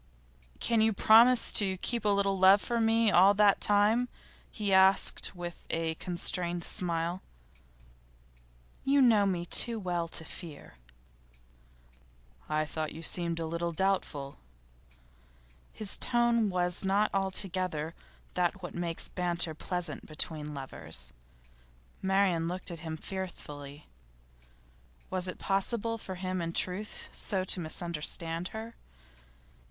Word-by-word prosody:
'Can 230 Hz, -2 st, +2 dB
you 220 Hz, 0 st, +3 dB
promise 230 Hz, +5 st, +6 dB
to 190 Hz, -3 st, +3 dB
keep 235 Hz, +5 st, -2 dB
a -, -, +3 dB
little 200 Hz, -1 st, +2 dB
love 190 Hz, +2 st, +6 dB
for 235 Hz, +2 st, -1 dB
me 225 Hz, -1 st, +3 dB
all 195 Hz, +3 st, +6 dB
that 205 Hz, -1 st, +4 dB
time?' 215 Hz, +4 st, +3 dB, 0.4 s
he 205 Hz, -3 st, -2 dB
asked 190 Hz, 0 st, +4 dB
with 175 Hz, -1 st, -8 dB
a 165 Hz, 0 st, -1 dB
constrained 175 Hz, 0 st, 0 dB
smile. 170 Hz, +1 st, -1 dB, 1.6 s
'You 280 Hz, +1 st, +3 dB
know 220 Hz, -6 st, +5 dB
me 175 Hz, -3 st, -2 dB
too 230 Hz, +5 st, +2 dB
well 175 Hz, -3 st, -2 dB
to 165 Hz, -1 st, -4 dB
fear.' 155 Hz, -, -10 dB, 1.7 s
'I 155 Hz, 0 st, 0 dB
thought 155 Hz, 0 st, -4 dB
you 160 Hz, -, -9 dB
seemed 170 Hz, 0 st, -1 dB
a 165 Hz, -, -2 dB
little 170 Hz, +1 st, -3 dB
doubtful.' 160 Hz, -7 st, -2 dB, 1.3 s
His 215 Hz, -3 st, 0 dB
tone 235 Hz, -3 st, +2 dB
was 180 Hz, -1 st, 0 dB
not 200 Hz, +2 st, +2 dB
altogether 185 Hz, -4 st, -1 dB, 0.4 s
that 180 Hz, +2 st, -1 dB
which 175 Hz, -, -6 dB
makes 170 Hz, -1 st, -2 dB
banter 175 Hz, -2 st, -1 dB
pleasant 180 Hz, +3 st, -5 dB
between 150 Hz, -1 st, -3 dB
lovers. 80 Hz, -, -3 dB, 0.9 s
Marian 190 Hz, -4 st, +1 dB
looked 180 Hz, +1 st, -4 dB
at 170 Hz, -, -7 dB
him 160 Hz, -1 st, -6 dB
fearfully. 150 Hz, -6 st, -7 dB, 1.3 s
Was 185 Hz, -1 st, -2 dB
it 180 Hz, -, -6 dB
possible 230 Hz, +3 st, -1 dB
for 190 Hz, -3 st, -7 dB
him 185 Hz, 0 st, -3 dB
in 165 Hz, 0 st, -4 dB
truth 185 Hz, +5 st, -2 dB
so 190 Hz, -2 st, +1 dB
to 185 Hz, -, -1 dB
misunderstand 165 Hz, 0 st, 0 dB
her? 220 Hz, +3 st, -8 dB
185 Hz, 125 wpm, -30 LUFS, 165-200 Hz, 1.7 s, promise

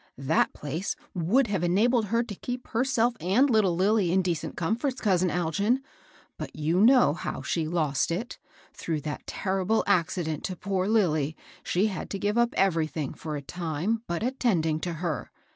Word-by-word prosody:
^^ -, -, -33 dB
That 135 Hz, +4 st, +2 dB
place 155 Hz, +7 st, -4 dB, 0.2 s
would 195 Hz, +10 st, +2 dB
have 200 Hz, -5 st, -1 dB
enabled 220 Hz, +7 st, +3 dB
her 230 Hz, +4 st, +1 dB
to 230 Hz, -, -7 dB
keep 245 Hz, +5 st, -6 dB
herself 240 Hz, 0 st, +1 dB
and 200 Hz, +11 st, +3 dB
little 215 Hz, -8 st, +3 dB
Lilly 195 Hz, 0 st, +2 dB
in 190 Hz, +1 st, +3 dB
deceit 170 Hz, -4 st, -2 dB
comforts, 240 Hz, -, -1 dB
cousiii 185 Hz, -4 st, +2 dB
Algin; 180 Hz, -, +1 dB, 0.6 s
but -, -, -6 dB
you 160 Hz, +5 st, +1 dB
know 245 Hz, -, +6 dB
how 170 Hz, -, -5 dB
she 160 Hz, -2 st, -1 dB
lost 155 Hz, -5 st, 0 dB
it. 200 Hz, +9 st, -4 dB, 0.3 s
Throng]^ 155 Hz, -4 st, -3 dB
that 150 Hz, -1 st, -5 dB
terrible 195 Hz, +3 st, 0 dB
accident 170 Hz, -4 st, 0 dB
to 185 Hz, -, -3 dB
poor 190 Hz, 0 st, -1 dB
Lilly, 160 Hz, -9 st, +1 dB, 0.3 s
she 185 Hz, +4 st, +1 dB
had 205 Hz, -4 st, -3 dB
to 195 Hz, -, -3 dB
give 205 Hz, +2 st, -1 dB
up 235 Hz, 0 st, +2 dB
everything, 160 Hz, -6 st, 0 dB
for 155 Hz, -2 st, -6 dB
a 145 Hz, -, -5 dB
time, 175 Hz, +7 st, -2 dB
but 170 Hz, +4 st, -2 dB
attending 195 Hz, -12 st, +1 dB
to 175 Hz, +1 st, -3 dB
her. 160 Hz, -3 st, -3 dB
185 Hz, 175 wpm, -27 LUFS, 160-220 Hz, 0.6 s, know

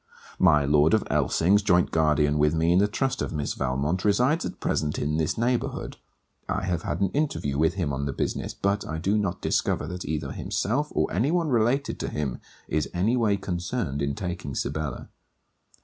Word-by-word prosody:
My 75 Hz, -6 st, +5 dB
Lord 75 Hz, +5 st, +4 dB
of 110 Hz, -, +1 dB
Elsings, 80 Hz, +7 st, +3 dB
joint 90 Hz, -3 st, +3 dB
guardian 75 Hz, -2 st, +2 dB
with 75 Hz, +2 st, +3 dB
me 80 Hz, +1 st, +2 dB
in 90 Hz, -, +5 dB
the 100 Hz, -, +4 dB
trust 130 Hz, +5 st, -1 dB
of -, -, -2 dB
Miss 75 Hz, -3 st, -2 dB
Valmont, 70 Hz, +7 st, -1 dB
resides 125 Hz, -, +2 dB
at -, -, -9 dB
present 75 Hz, -1 st, -1 dB
in 75 Hz, +2 st, -1 dB
this 80 Hz, -1 st, 0 dB
neighbourhood. 120 Hz, +1 st, -1 dB, 0.5 s
I 100 Hz, -, -1 dB
have 90 Hz, -3 st, -1 dB
had -, -, -3 dB
an 95 Hz, -, +2 dB
interview 140 Hz, -, -1 dB
with 80 Hz, +3 st, +2 dB
him 85 Hz, -8 st, -1 dB
on 70 Hz, +1 st, -2 dB
the -, -, -1 dB
business; -, -, -3 dB
but 100 Hz, +1 st, 0 dB
I 80 Hz, -, -3 dB
do 95 Hz, +6 st, 0 dB
not 95 Hz, -3 st, -1 dB
discover -, -, 0 dB
that 90 Hz, 0 st, -5 dB
either 75 Hz, -3 st, -3 dB
himself, 135 Hz, -, -1 dB
or -, -, 0 dB
any 115 Hz, +10 st, +1 dB
one 170 Hz, -1 st, +1 dB
related 120 Hz, +3 st, +1 dB
to -, -, -3 dB
him, 70 Hz, -5 st, -3 dB, 0.3 s
is 75 Hz, -1 st, -1 dB
any 100 Hz, +8 st, +2 dB
way 110 Hz, -5 st, +2 dB
concerned 90 Hz, -, -3 dB
in 70 Hz, 0 st, -1 dB
taking 85 Hz, -7 st, -5 dB
Sibella. 75 Hz, -1 st, -3 dB
85 Hz, 195 wpm, -26 LUFS, 75-105 Hz, 0.5 s, My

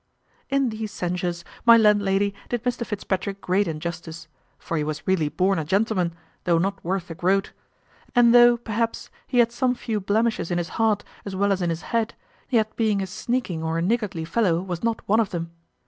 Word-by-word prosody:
In 275 Hz, -2 st, +2 dB
these 220 Hz, -1 st, -5 dB
censures 175 Hz, -1 st, -3 dB, 0.2 s
my 235 Hz, -1 st, +8 dB
landlady 205 Hz, -2 st, +3 dB, 0.2 s
did 240 Hz, -2 st, -2 dB
Mr 245 Hz, -1 st, -1 dB
Fitzpatrick 200 Hz, -2 st, -3 dB
great 195 Hz, +2 st, +1 dB
injustice; 165 Hz, +1 st, -5 dB, 0.3 s
for 165 Hz, -, -5 dB
he 155 Hz, -, 0 dB
was 150 Hz, 0 st, -4 dB
really 175 Hz, -6 st, +1 dB
born 190 Hz, +2 st, +1 dB
a -, -, -1 dB
gentleman, 185 Hz, 0 st, 0 dB, 0.3 s
though 170 Hz, -2 st, +3 dB
not 195 Hz, +4 st, -1 dB
worth 180 Hz, 0 st, -2 dB
a -, -, -3 dB
groat; 190 Hz, +4 st, +1 dB, 0.6 s
and 240 Hz, -1 st, +6 dB
though, 240 Hz, 0 st, +7 dB
perhaps, 230 Hz, 0 st, -3 dB, 0.2 s
he 250 Hz, -, -2 dB
had 235 Hz, -1 st, +5 dB
some 250 Hz, +1 st, +1 dB
few 225 Hz, -3 st, -2 dB
blemishes 215 Hz, -1 st, 0 dB
in 175 Hz, -, 0 dB
his 170 Hz, -1 st, -2 dB
heart 220 Hz, -3 st, +1 dB, 0.2 s
as 200 Hz, -2 st, -6 dB
well 200 Hz, +1 st, +2 dB
as 190 Hz, -1 st, 0 dB
in 175 Hz, -, 0 dB
his 165 Hz, 0 st, -3 dB
head, 230 Hz, -1 st, 0 dB, 0.3 s
yet 220 Hz, -4 st, +1 dB
being 215 Hz, -3 st, +1 dB
a -, -, -2 dB
sneaking 195 Hz, -2 st, -2 dB
or 160 Hz, 0 st, -1 dB
a -, -, 0 dB
niggardly 205 Hz, -5 st, -1 dB
fellow 170 Hz, -1 st, +1 dB
was 180 Hz, -2 st, -4 dB
not 230 Hz, -1 st, -1 dB
one 220 Hz, +3 st, +4 dB
of 220 Hz, -4 st, +1 dB
them. 170 Hz, -1 st, -4 dB
195 Hz, 195 wpm, -24 LUFS, 175-225 Hz, 0.6 s, my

